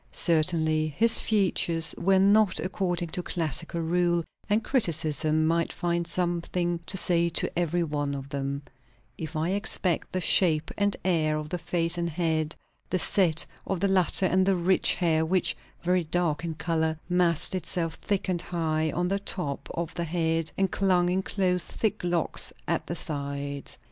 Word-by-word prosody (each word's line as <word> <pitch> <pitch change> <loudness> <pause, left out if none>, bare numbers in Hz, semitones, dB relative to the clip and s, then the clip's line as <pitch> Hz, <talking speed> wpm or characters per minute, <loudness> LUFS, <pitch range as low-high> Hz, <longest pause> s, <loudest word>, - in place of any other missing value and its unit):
Certainly 160 -2 +1
his 230 0 +8
features 170 -6 +2
were 190 +2 +2
not 200 -1 +4
according 175 0 -2
to 180 - -3
classical 170 0 -2
rule, 175 +1 +1 0.3
and 215 +2 +2
criticism 155 - +2
might 165 +1 +1
find 170 -1 -2
something 175 0 -1
to 190 - -1
say 170 -2 +2
to 165 - 0
every 175 0 0
one 145 -3 -2
of 135 0 -7
them; 140 +1 -4 0.6
if 160 0 -6
I 155 +2 -1
except 190 -3 +1
the 185 - -1
shape 165 -3 +3
and 205 0 0
air 155 -4 +1
of 150 0 -6
the 180 - -3
face 170 0 -1
and 170 0 -1
head, 160 -1 -1 0.3
the 185 - +1
set 175 -3 +2 0.2
of 195 - -2
the 200 - +1
latter, 190 0 +2
and 185 +1 +3
the 195 0 +2
rich 180 +1 +2
hair; 160 -3 +1
which, 175 -2 +1 0.3
very 180 0 +1
dark 165 -1 -1
in 165 -2 -4
colour, 160 -1 -1
massed 175 -2 +2
itself 170 -2 -2
thick 200 -2 -1
and 180 -2 -1
high 160 -3 -1
on 175 +1 -1
the 195 +2 -1
top 145 -9 -4
of 170 -1 -4
the 170 -1 -3
head, 165 -1 -1
and 195 -1 +1
clung 180 -3 +2
in 185 +1 +1
close 180 -2 -1
thick 220 -5 -3
locks 175 -2 +1 0.2
at - - -1
the - - -3
sides. 140 -1 -5
170 Hz, 170 wpm, -27 LUFS, 160-180 Hz, 0.6 s, his